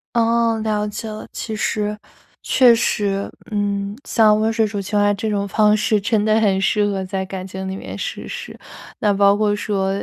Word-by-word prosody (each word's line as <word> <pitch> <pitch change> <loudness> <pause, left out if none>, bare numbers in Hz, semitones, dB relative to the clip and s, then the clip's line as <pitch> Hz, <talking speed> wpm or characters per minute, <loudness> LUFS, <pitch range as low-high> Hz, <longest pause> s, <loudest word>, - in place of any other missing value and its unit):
哦， 230 -1 +2
了 210 -1 0
解 215 +2 -6
了。 215 0 -7
其 220 - -5
实 210 -1 -1 0.5
确 250 -3 +5
实， 200 -3 0 0.2
嗯， 200 -1 -2
像 215 -2 +4
温 220 +1 +1
水 225 0 +2
煮 205 -1 -3
青 205 +2 -2
蛙 205 0 +3
这 215 +2 -3
种 200 -1 -1
方 210 +1 +3
式， 210 0 +1
真 210 +1 +1
的 215 0 +3
很 195 -3 +2
适 210 +2 +2
合 195 -2 -2
在 190 0 -3
感 190 0 -6
情 190 0 -6
里 190 - -4
面 - - -7
实 - - -5
施。 485 0 -7 0.4
那 210 -2 +2
包 200 0 +4
括 210 -1 +1
说， 195 -2 -1
210 Hz, 210 characters per minute, -20 LUFS, 200-220 Hz, 0.5 s, 确